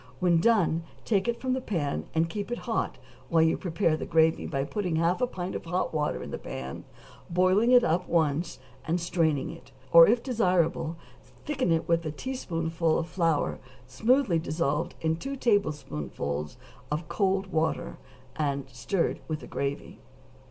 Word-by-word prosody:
When 175 -2 +3
done 180 -7 +3 0.2
take 200 -1 +1
it 235 0 -1
from 255 -1 -1
the 260 - -1
pan, 145 - -2
and 165 +1 +3
keep 200 +5 -5
it 240 - -1
hot - - -1 0.3
while 165 -1 +4
you 160 - +3
prepare 170 -2 0
the - - -5
gravy 160 0 +3
by 135 -2 -1
putting 180 +2 -2
half 170 +6 +1
a 250 - +3
pint 185 -5 -5
of - - -5
hot 180 +1 -1
water 150 -1 -1
in - - -8
the - - -4
pan, 65 +1 -7 0.4
boiling 185 +6 +3
it 250 -1 +7
up 175 +3 +1
once, 160 0 +1 0.3
and 170 +3 0
straining 165 -5 0
it; - - -13 0.2
or 170 0 +10
if 235 +2 +2
desirable 180 - +1 0.5
thicken 265 - 0
it 165 -1 +1
with 170 0 +2
a 155 - -3
teaspoonful 165 - -1
of 165 - -2
flour 165 -3 0 0.3
smoothly 220 - +2
dissolved 160 0 -1
in 160 0 +1
two 275 +10 -5
tablespoonfuls 75 - -1 0.3
of 150 +2 -3
cold 195 -1 0
water 160 - -1 0.4
and 140 -3 -1
stirred 150 +9 -1
with 155 -1 -3
the - - -9
gravy. 140 0 -4
165 Hz, 165 wpm, -28 LUFS, 155-195 Hz, 0.5 s, or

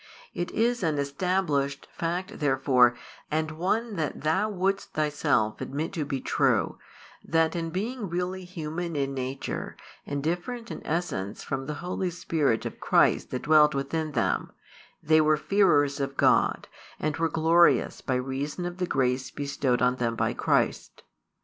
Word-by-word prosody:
It 175 - -3
is 240 +1 +1
an 160 -4 0
established 140 -1 -1
fact 175 +3 -3
therefore, 130 -4 +4 0.3
and 155 +1 -1
one 200 +7 -1
that 155 -2 -2
thou 190 +8 +1
wouldst 195 0 -1
thyself 145 -7 +1
admit 150 +4 -3
to 155 -3 -2
be 135 -1 -2
true, - - +1 0.4
that 165 0 +2 0.2
being 210 +3 -3
really 180 +2 -2
human 170 -1 -5
in 140 -1 -1
nature, 130 0 -4 0.3
and 140 -1 -3
different 220 +9 -3
in - - -7
essence 150 - -2
from 135 -1 -4
the 150 - -3
Holy 180 0 -1
Spirit 155 -8 0
of - - -6
Christ - - +3
that 125 - -4
dwelt 150 -1 +5
within 150 +3 -2
them, 120 - 0 0.5
they 155 +1 +5
were 155 0 +3
fearers 150 -4 +3
of 135 0 -3
God, - - +3 0.3
and 155 -2 -1
were 165 0 +1
glorious 165 +2 +3
by 130 - -1
reason 135 +7 -3
of 175 0 -5
the 180 -1 -1
grace 130 -2 0
bestowed 140 -3 -1
on 125 0 +2
them 115 -2 -1
by - - 0
Christ. - - 0
155 Hz, 150 wpm, -27 LUFS, 140-175 Hz, 0.5 s, dwelt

